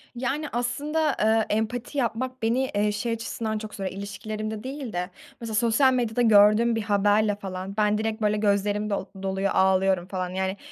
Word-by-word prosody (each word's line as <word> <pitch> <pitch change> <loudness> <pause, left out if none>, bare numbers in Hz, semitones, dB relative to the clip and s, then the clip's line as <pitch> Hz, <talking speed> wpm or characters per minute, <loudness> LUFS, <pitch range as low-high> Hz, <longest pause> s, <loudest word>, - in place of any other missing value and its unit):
Yani, 275 +5 -2
aslında, 285 +6 0
ııı, 220 0 +3
empati 230 +6 -2
yapmak 255 +1 -2
beni, 245 +4 +1
eee, 210 +1 +2
şey 210 +3 -2
açısından 225 -1 -3
çok 215 0 -7
zorluyor, 190 -1 -5
ilişkilerimde 215 +2 -5
değil 265 -4 -6
de, 180 +1 -2 0.3
mesela, 225 -2 -4
sosyal 235 +4 +4
medyada 245 -1 0
gördüğüm 220 +1 +5
bir 225 - -1
haberle 205 0 +2
falan 195 0 -6
ben 210 0 +2
direkt, 220 +1 -2
böyle, 210 0 +2
gözlerim 205 0 +1
do 200 -1 -2 0.2
doluyor, 195 0 -1
ağlıyorum 190 -1 +2
falan. 185 -1 -3
Yani, 190 +1 -2
215 Hz, 170 wpm, -25 LUFS, 200-235 Hz, 0.3 s, gördüğüm